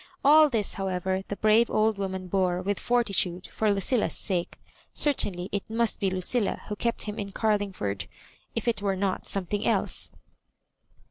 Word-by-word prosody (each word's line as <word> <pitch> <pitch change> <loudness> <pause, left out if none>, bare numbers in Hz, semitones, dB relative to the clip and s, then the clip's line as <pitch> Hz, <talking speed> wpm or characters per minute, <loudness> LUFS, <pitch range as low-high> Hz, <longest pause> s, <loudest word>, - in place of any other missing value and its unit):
All 305 +1 +7
this, 225 -6 -1
however, 190 -1 -2
the 205 - -4
brave 215 +3 +3
old 215 -1 +1
woman 190 -1 -3
bore 180 -1 +1
with 200 +1 -1
fortitude 200 -7 +1
for 215 -1 +1
Lucilla's 205 +4 +2
sake: 180 -4 -2 0.4
certainly 195 -11 +1
it 200 - -1
must 230 0 0
be 195 - +1
Lucilla 190 +4 0
who 210 - -2
kept 235 +2 -1
him 210 -1 -5
in 200 - -3
Gar 215 +2 +1
lingford 100 - -4 0.2
— - - -16
^if - - -2
it 230 -3 +1
were 200 -1 0
not 190 0 -2
something 200 +2 -1
else. - - 0
200 Hz, 170 wpm, -27 LUFS, 185-220 Hz, 0.4 s, All